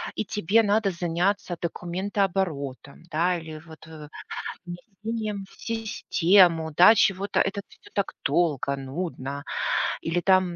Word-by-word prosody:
и - - -1
тебе 210 +2 +2
надо 205 -1 +2
заняться 175 +2 -1
документооборотом, 175 -6 -2
да, 175 +3 +1
или 160 -1 -8
вот 160 0 -13
в 155 -2 -10 0.6
внесением 205 +3 -5
в - - -20
систему, 185 -7 +3
да, 180 +7 +8
чего-то. 195 -1 +2
Это 195 +1 0
всё - - -19
так 200 -1 -1
долго, 145 -2 +1
нудно. 140 -1 -5 0.6
Или, 170 +2 0
там, 185 -2 +3
180 Hz, 120 wpm, -25 LUFS, 160-200 Hz, 0.6 s, да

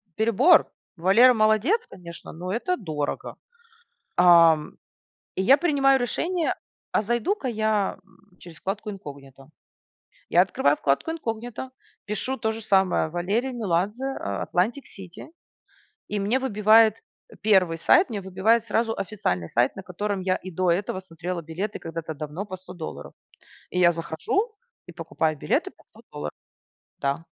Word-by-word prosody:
перебор. 235 - +4 0.3
Валера 210 +9 +6
молодец, 220 - +2
конечно, 170 -2 -11
но 180 +3 -6
это 360 +11 -1
дорого". 155 - -4 0.8
Ам, 165 -3 +6 0.6
и 190 - 0
я 270 +8 +6
принимаю 275 -4 +3
решение, 330 +8 -1 0.4
а - - +2
зайду-ка 240 - -1
я, 215 -3 0
м, 195 -1 -27
через 170 -2 -13
вкладку 205 +3 -4
инкогнито. 140 -7 -11 0.8
Я 175 - +5
открываю 150 -6 +2
вкладку 140 - 0
инкогнито, 240 -4 -5 0.4
пишу 225 +5 -3
тоже 220 0 -2
самое 190 -6 +2
Валерий 200 +10 -1
Меладзе, 210 +2 -1
а, 100 -1 -3
Atlantic 225 +10 0
City 185 - -10 0.8
и 210 - -2
мне 210 +6 +1
выбивает, 220 -2 +4 0.3
э, - - -15
1 185 -6 +3
сайт, 350 - +4
мне 205 -3 -4
выбивает 205 +5 +1
сразу 225 +1 0
официальный 190 - -2
сайт, 120 +2 +1
на 195 - -8
котором 195 +2 -3
я 185 0 +1
и 185 - -8
до 180 +2 0
этого 185 +1 -1
смотрела 175 -1 -6
билеты 180 +7 -5
когда-то 165 -1 -6
давно 155 +7 -6
по 185 -2 -7
100 180 0 -12
долларов. 165 -3 -8 0.6
И 180 - -1
я 175 -1 +6
захожу 170 - -2 0.3
и 175 - -11
покупаю 160 -2 -2
билеты - - -1
по - - -25
100 - - -18
долларов. 75 0 -5 0.7
Да. 140 +4 -2
195 Hz, 140 wpm, -25 LUFS, 170-225 Hz, 0.8 s, Валера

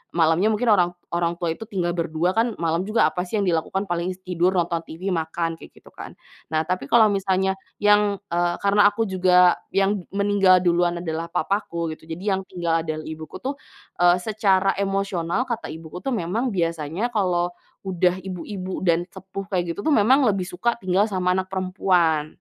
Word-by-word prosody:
malamnya 165 +4 +3
mungkin 220 +1 +2
orang 180 -4 +4 0.3
orang 170 0 0
tua 170 -2 -1
itu - - -8
tinggal 180 -5 -1
berdua 170 +1 0
kan 225 0 +1
malam 165 +2 0
juga 225 +2 +3
apa 180 - -2
sih 220 - -4
yang 200 - 0
dilakukan 180 +3 0
paling 175 +1 -2
tidur, 180 0 +1
nonton 170 -1 0
TV, 180 +5 -5
makan, 165 +1 -2
kayak - - -13
gitu - - -18
kan. - - -8 0.4
Nah, 155 0 +1
tapi 180 -6 -2
kalau 225 -2 +7
misalnya 190 -1 0 0.2
yang, 205 -1 +3
eee, 175 0 +1
karena 205 +1 +5
aku 225 +2 -1
juga 180 -1 +4 0.2
yang 195 -1 +1
meninggal 200 -2 +4
duluan 175 0 +2
adalah 165 -1 -4
papaku 170 -2 -1
gitu, - - -25
jadi 185 +5 -1
yang 190 - -3
tinggal 170 -2 -1
dengan 155 -1 -4
ibuku 155 0 -8
tuh, 275 +2 -2 0.4
eee, 175 0 +6
secara 195 -3 +2
emosional 195 +1 -1
kata 235 -1 -4
ibuku 160 +2 -8
tuh 270 - -3
memang 210 +8 -1
biasanya 170 +4 -2
kalau 180 -4 +1 0.3
udah 180 -1 +1
ibu-ibu 185 +1 -6
dan 175 -1 +2
sepuh 190 +1 -8
kayak 175 -3 -1
gitu - - -9
tuh, 310 - +3
memang 260 +6 +4
lebih 195 -2 +1
suka 195 +6 0
tinggal 190 +1 +2
sama 185 -3 0
anak 185 - -2
perempuan. 180 -5 +1
185 Hz, 180 wpm, -23 LUFS, 170-200 Hz, 0.4 s, kalau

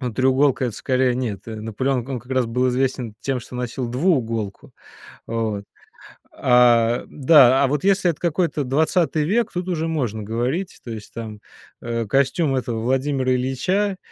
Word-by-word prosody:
Ну, 125 -3 -3
треуголка- 130 +2 +2
это 115 - -5
скорее 130 -1 +1
нет. 120 -6 -3
Наполеон, 115 +3 -2
он 135 -2 -3
как 125 +3 -8
раз 130 -2 +1
был 125 +3 0
известен 125 -3 -1
тем, 130 +2 -2
что 120 - -12
носил 125 0 -3
двууголку. 115 - -1 0.5
Вот. 110 -3 -2 0.7
А, 120 -1 +4
да. 135 -2 +5
А - - +4
вот 145 +1 -1
если 195 -2 +3
это 150 - -12
какой-то 170 -2 0
20 155 +3 +1
век- 215 +7 +1
тут 180 0 -3
уже 165 -2 -1
можно 120 -10 -2
говорить. 125 - -3
То - - -9
есть 110 -2 -9
там, 110 -2 -7 0.4
э, 115 -1 -3
костюм 135 - +1
этого 120 -3 -2
Владимира 130 +1 0
Ильича 185 +11 0
130 Hz, 155 wpm, -22 LUFS, 115-145 Hz, 0.7 s, да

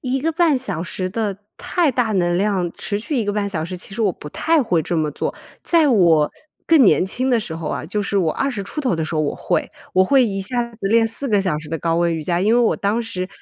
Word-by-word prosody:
1 260 +1 -1
个 325 - 0
半 330 -3 +3
小 250 -11 -3
时 185 +1 -4
的 205 -2 -2 0.2
太 345 -5 +1
大 235 -3 0
能 175 -2 +1
量， 190 -3 0
持 205 -1 -3
续 250 +7 -3
1 230 - +1
个 205 - -1
半 205 -1 -1
小 160 -5 -2
时， 180 +2 -6
其 195 +2 -8
实 230 - -2
我 200 -4 +2
不 150 - -10
太 320 - +1
会 175 -8 +1
这 175 - -2
么 155 -1 0
做。 - - -3 0.3
在 330 -3 +3
我 170 - +4 0.3
更 320 -5 +6
年 190 - +5
轻 255 +7 -1
的 245 - +3
时 170 -6 -6
候 165 -2 -5
啊， - - -3
就 205 +6 -2
是 200 0 0
我 165 -5 +1
20 255 -7 -2
出 300 - -5
头 255 - 0
的 160 - -1
时 160 - -5
候， 155 - +1
我 145 - -1
会。 - - -1 0.2
我 185 - +5
会 265 +4 +4
一 195 -3 -2
下 240 +4 -1
子 235 - -17
练 225 +2 +4
4 250 +5 -3
个 205 -3 +3
小 185 -6 0
时 155 - -9
的 165 +1 -3
高 165 +1 0
温 170 0 +2
瑜 160 - -4
伽， 175 +2 0
因 210 +4 +2
为 245 - +4
我 230 - +2
当 205 +3 0
时 185 -6 -4
200 Hz, 275 characters per minute, -20 LUFS, 175-245 Hz, 0.3 s, 更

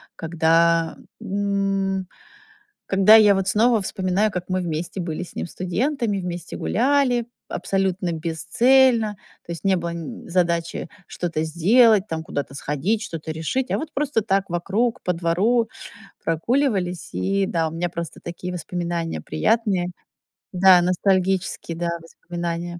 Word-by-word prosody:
Когда, 165 0 +2 0.2
м, 195 -1 -1 0.8
когда 195 +2 +6
я 210 -2 +6
вот 190 -1 -1
снова 225 +1 +3
вспоминаю, 190 +3 0
как 180 -1 -3
мы 185 0 0
вместе 170 +3 -4
были 170 0 -4
с 180 - -9
ним - - -3
студентами, 210 - -1
вместе 175 -2 -5
гуляли 250 0 +1 0.2
абсолютно 190 -2 -1
бесцельно. 220 +7 +3 0.3
То 170 - -5
есть 170 - -8
не 195 -1 +3
было 170 -1 -3
н 165 -2 -7
задачи 170 -2 0 0.2
что-то 165 -3 -3
сделать, 205 +6 +4
там, 160 0 -3
куда-то 140 -3 -4
сходить, 150 - -1
что-то 165 -6 -6
решить. 205 +12 -2
А - - +1
вот 310 0 -6
просто 275 -6 0
так 195 -3 0
вокруг 210 +8 -1
по 180 - 0
двору 190 +8 +1 0.6
прогуливались. 185 - 0
И 195 0 0
да, 165 -2 0
у - - -11
меня 175 +2 -2
просто 170 -1 -6
такие 180 +1 -6
воспоминания 170 - -3
приятные. 185 - +1 0.7
Да, 185 -1 +6
ностальгические, 185 -1 0
да, 170 0 -1
воспоминания. 170 +1 -5
185 Hz, 135 wpm, -23 LUFS, 170-210 Hz, 0.8 s, когда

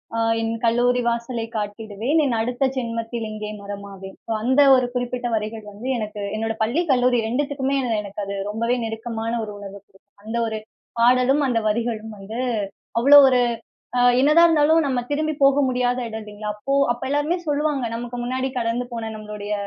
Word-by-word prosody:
அ - - -1 0.2
என் 225 0 -1
கல்லூரி 245 +2 +3
வாசலை 235 0 -3
காட்டிடுவேன். 215 +7 -2
என் 240 -4 0
அடுத்த 245 +3 -1
ஜென்மத்தில் 230 -1 -3
இங்கே 215 0 -5
மரமாவேன்." 200 -1 -9
ஸோ - - -4
அந்த 260 +4 +4
ஒரு 255 -1 +2
குறிப்பிட்ட 245 0 -2
வரிகள் 215 0 -4
வந்து, 215 +6 -8
எனக்கு 210 -2 -5
என்னோட 225 0 -2
பள்ளி, 260 +11 +1
கல்லூரி 250 -1 +3
2த்துக்குமே 275 +2 -1
என 230 -3 0
எனக்கு 200 +1 -7
அது 200 0 -4
ரொம்பவே 230 +3 0
நெருக்கமான 225 0 -4
ஒரு 210 - -8
உணர்வு 200 0 -9
குடுக்கும். 200 +1 -28
அந்த 225 +2 -3
1 220 -1 -3 0.4
பாடலும், 255 +4 +4
அந்த 230 -2 +2
வரிகளும் 220 -1 -2
வந்து 215 +4 -7 0.6
அவ்வளோ 280 +4 +8
ஒரு 255 -1 +3 0.6
அ - - +3 0.2
என்னதான் 305 +5 +6
இருந்தாலும் 315 +1 +4
நம்ம 260 -3 0
திரும்பி 310 +2 0
போக 275 +1 +5
முடியாத 250 0 0
இடம் 220 0 -6
இல்லைங்களா? 210 0 -7
அப்போ 275 +6 -3 0.2
அப்ப 240 - -4
எல்லாருமே 290 +5 +1
சொல்லுவாங்க. 290 -3 0
நமக்கு 240 +1 -5
முன்னாடி 260 +2 -1
கடந்து 235 +1 -1
போன 230 -2 -4
நம்முடைய 210 -1 -6
235 Hz, 170 wpm, -22 LUFS, 215-255 Hz, 0.6 s, அவ்வளோ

